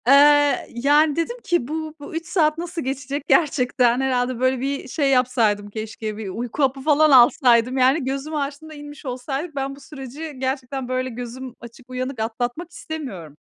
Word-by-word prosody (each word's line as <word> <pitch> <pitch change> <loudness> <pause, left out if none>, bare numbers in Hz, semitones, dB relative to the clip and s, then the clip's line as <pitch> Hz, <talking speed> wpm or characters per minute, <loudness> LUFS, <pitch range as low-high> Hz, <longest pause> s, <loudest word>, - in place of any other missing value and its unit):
Eee, 290 +1 +5
yani 290 +5 +3
dedim 335 +9 -2
ki, 345 -9 0
bu, 315 +1 -4
bu 290 +2 -9
3 330 +1 -3
saat 310 -4 +2
nasıl 340 0 -4
geçecek 270 +2 -3
gerçekten? 250 -5 +3
Herhâlde 250 -2 0
böyle, 255 0 +2
bir 275 +1 -3
şey, 280 +2 0
yapsaydım 230 -5 +2
keşke, 215 0 -6
bir 215 -3 -5
uyku 240 +8 -3
hapı 270 0 +1
falan 305 +1 +4
alsaydım 245 -1 +5
yani. 265 +4 +3
Gözümü 275 +4 -3
açtığımda 290 +2 -5
inmiş 290 0 -11
olsaydık. 270 +5 -4
Ben 275 0 -3
bu - - -15
süreci 285 +2 -8
gerçekten 265 0 -3
böyle 255 0 -1
gözüm 245 +1 -7
açık, 240 +2 -14
uyanık 255 0 -4
atlatmak 245 +9 -3
istemiyorum. 225 - -7
265 Hz, 165 wpm, -22 LUFS, 245-295 Hz, -, Eee